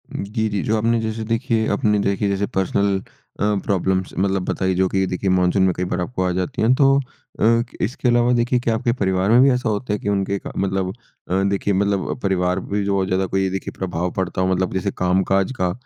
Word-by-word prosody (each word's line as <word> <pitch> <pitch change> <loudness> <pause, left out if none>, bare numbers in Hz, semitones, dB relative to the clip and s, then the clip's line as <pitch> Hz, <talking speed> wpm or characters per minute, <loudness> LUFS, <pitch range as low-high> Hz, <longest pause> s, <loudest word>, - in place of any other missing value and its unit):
जी, 110 +3 -2
जी। 100 -2 -1
जो 110 - +1
आपने 115 +2 +1
जैसे 110 0 -3
देखिए 115 0 0
अपने 105 -5 +2
देखिए 100 0 0
जैसे 100 +1 0
पर्सनल 100 +1 +1 0.4
अ, 105 0 +2
प्रॉब्लम्स 95 -1 0
मतलब 95 0 +1
बताई 95 -1 0
जो 95 +1 +2
कि 95 0 +1
देखिए 95 +1 -2
मानसून 95 +1 +3
में 95 -1 +3
कई 90 - -3
बार 90 - -1
आपको 95 +1 -2
आ 90 - +1
जाती 90 - -3
हैं। 115 +3 +4
तो 135 0 +4 0.4
अ, 115 +1 +4 0.2
इसके 125 +3 -1
अलावा 120 0 +3
देखिए 120 +1 +1
क्या 120 -1 0
आपके 120 +1 0
परिवार 95 -4 0
में 120 +2 +6
भी 135 - +6
ऐसा 125 -2 0
होता 105 +1 -2
है 105 - -2
कि 100 - -3
उनके 100 0 0
क - - -6
मतलब 95 -1 -1 0.4
अ, 95 +2 +1
देखिए 100 +1 0
मतलब 100 0 0
परिवार 90 -1 +1
पे - - -9 0.2
भी 100 - -2
बहुत 95 -1 +1
ज़्यादा 95 0 +1
कोई 95 +1 0
देखिए 95 +1 -4
प्रभाव 90 -1 -2
पड़ता 95 0 -2
हो? 95 - +2
मतलब 95 0 -1
जैसे 95 +1 -1
कामकाज 95 +2 +1
का, 90 -1 +1
100 Hz, 225 wpm, -21 LUFS, 95-110 Hz, 0.4 s, में